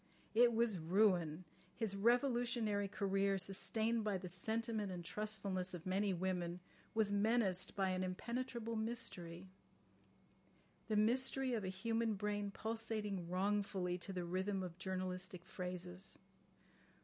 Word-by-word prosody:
It 240 Hz, +2 st, +7 dB
was 225 Hz, -5 st, +3 dB
ruin. 175 Hz, -2 st, +3 dB, 0.3 s
His 220 Hz, -4 st, -1 dB
revolutionary 235 Hz, -2 st, +2 dB
career, 195 Hz, -1 st, +1 dB
sustained 220 Hz, +4 st, +1 dB
by 210 Hz, -2 st, +1 dB
the 180 Hz, 0 st, -6 dB
sentiment 220 Hz, +2 st, -1 dB
and 175 Hz, -2 st, -5 dB
trustfulness 195 Hz, -2 st, -1 dB
of 170 Hz, -, -8 dB
many 195 Hz, +2 st, +2 dB
women, 180 Hz, -1 st, -1 dB, 0.4 s
was 215 Hz, -2 st, +3 dB
menaced 205 Hz, -3 st, +2 dB
by 190 Hz, -2 st, +2 dB
an 185 Hz, 0 st, 0 dB
impenetrable 235 Hz, +4 st, -3 dB
mystery—the 205 Hz, -7 st, -3 dB, 1.5 s
mystery 255 Hz, +4 st, +2 dB
of 220 Hz, -3 st, 0 dB
a -, -, -2 dB
human 225 Hz, +3 st, 0 dB
brain 205 Hz, 0 st, -1 dB
pulsating 215 Hz, -4 st, -2 dB
wrongfully 190 Hz, -1 st, 0 dB
to 195 Hz, -, -4 dB
the 180 Hz, -2 st, -2 dB
rhythm 190 Hz, +2 st, -1 dB
of 180 Hz, -1 st, -7 dB
journalistic 185 Hz, -1 st, -2 dB
phrases. 180 Hz, 0 st, -5 dB
200 Hz, 120 wpm, -39 LUFS, 185-225 Hz, 1.5 s, It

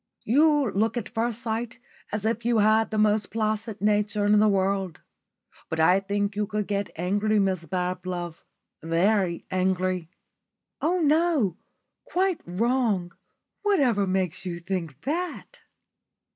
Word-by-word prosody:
You 290 Hz, 0 st, +3 dB
look 220 Hz, +5 st, 0 dB
at 230 Hz, -, -3 dB
first 230 Hz, 0 st, -2 dB
sight 230 Hz, +1 st, -3 dB, 0.3 s
as 210 Hz, 0 st, -3 dB
if 230 Hz, +1 st, 0 dB
you 235 Hz, 0 st, +2 dB
had 215 Hz, +1 st, +4 dB
the 215 Hz, -, -3 dB
most 210 Hz, -1 st, +2 dB
placid 215 Hz, 0 st, -2 dB
nature 210 Hz, 0 st, +1 dB
in 205 Hz, 0 st, +5 dB
the 215 Hz, -, +5 dB
world. 195 Hz, -3 st, 0 dB, 0.7 s
But 160 Hz, -, -3 dB
I 180 Hz, +4 st, +5 dB
think 200 Hz, +1 st, -2 dB
you 210 Hz, 0 st, -1 dB
could 210 Hz, 0 st, -2 dB
get 200 Hz, 0 st, -2 dB
angry, 205 Hz, +5 st, +1 dB
Mrs 190 Hz, -4 st, 0 dB
Bablove 180 Hz, -2 st, -3 dB, 0.4 s
very 170 Hz, +2 st, +1 dB
angry." 185 Hz, -2 st, 0 dB, 0.7 s
"Oh, 350 Hz, +3 st, +1 dB
no. 305 Hz, -, +2 dB, 0.5 s
Quite 370 Hz, -1 st, 0 dB
wrong. 205 Hz, -2 st, 0 dB, 0.5 s
Whatever 265 Hz, -, +2 dB
makes 185 Hz, -1 st, -1 dB
you 175 Hz, -2 st, -4 dB
think 170 Hz, -5 st, -4 dB
that?" 360 Hz, -, -4 dB
205 Hz, 130 wpm, -26 LUFS, 185-230 Hz, 0.7 s, in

